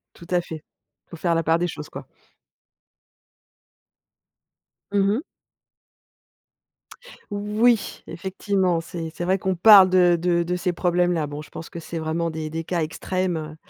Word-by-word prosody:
Tout 170 - -14
à 175 -1 +3
fait. 160 -2 -9 0.4
Il - - -41
faut 170 - -8
faire 170 0 0
la 165 - +1
part 165 +2 +2
des 175 - 0
choses, 150 -2 -7
quoi. - - -9 2.8
Mmh 200 -1 +2
mh. 235 - 0 2.1
Oui, 210 +3 +1
effectivement, 185 0 -1
c'est 165 0 -6
c'est - - -5
vrai 185 +2 +2
qu'on 190 0 -1
parle 195 +1 +8
de 180 -2 +5
de 175 0 +1
de 175 +1 -1
ces 180 0 -1
problèmes-là. 175 -2 +1
Bon, 145 +1 -7
je - - -16
pense 165 - -8
que 170 - -8
c'est 165 0 -6
vraiment 165 +1 -2
des 155 -1 -5
des 165 +1 -4
cas 170 0 -2
extrêmes. 185 +3 -2
Heu, 155 -1 -7
175 Hz, 160 wpm, -23 LUFS, 165-185 Hz, 2.8 s, parle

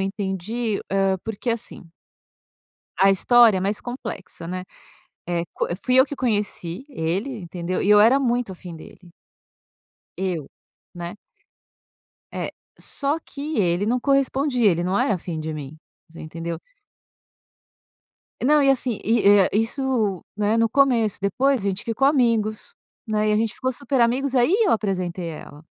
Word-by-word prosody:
entendi, 200 +3 -2
hã, 195 -1 +1
porque 225 +2 -3
assim 230 -4 -4 1.2
a 195 +1 +6
história 225 +1 +5
é - - -3
mais 200 +3 -1
complexa, 220 -8 -7
né. 185 +1 -5 0.6
Eh, 170 -1 0
co - - -2 0.2
fui 255 0 +3
eu 260 +2 +6
que 285 - -6
conheci 210 -4 -2
ele, 205 - -3
entendeu, 175 +1 -4
e - - 0
eu 210 - +8
era 245 +6 +5
muito 240 -5 0
afim 175 -2 -10
dele. 175 +2 -14 1.1
Eu, 180 -6 -3 0.5
né. 175 +2 -6 1.2
É. - - -4 0.3
Só 285 +3 -1
que 295 -1 -5
ele 175 +1 +1
não 245 +3 0
correspondia, 270 -4 +2
ele 170 0 0
não 185 +3 0
era 200 -4 +1
fim 165 -1 -5
de 155 0 -4
mim, 150 0 -7 0.3
você 165 - -12
entendeu. 165 +1 -5 1.8
Não, 295 +3 +4
e 275 - +5
assim 250 -4 0
e, 225 +1 +2
hã, 200 -2 +6
isso, 225 - 0
né, 210 +2 +1
no 230 0 +3
começo, 240 -5 +2
depois 255 +7 +1
a - - +1
gente 195 0 -3
ficou 235 +4 +1
amigos, 230 - +1 0.3
né. 215 -1 0
E - - +3
a - - +3
gente 225 -1 0
ficou 260 0 -2
super 275 0 -1
amigos, 255 +3 +1
aí 255 +9 +4
eu 385 - +3
apresentei 180 -5 -2
à - - -7
ela. 150 +2 -12
215 Hz, 155 wpm, -23 LUFS, 185-250 Hz, 1.8 s, eu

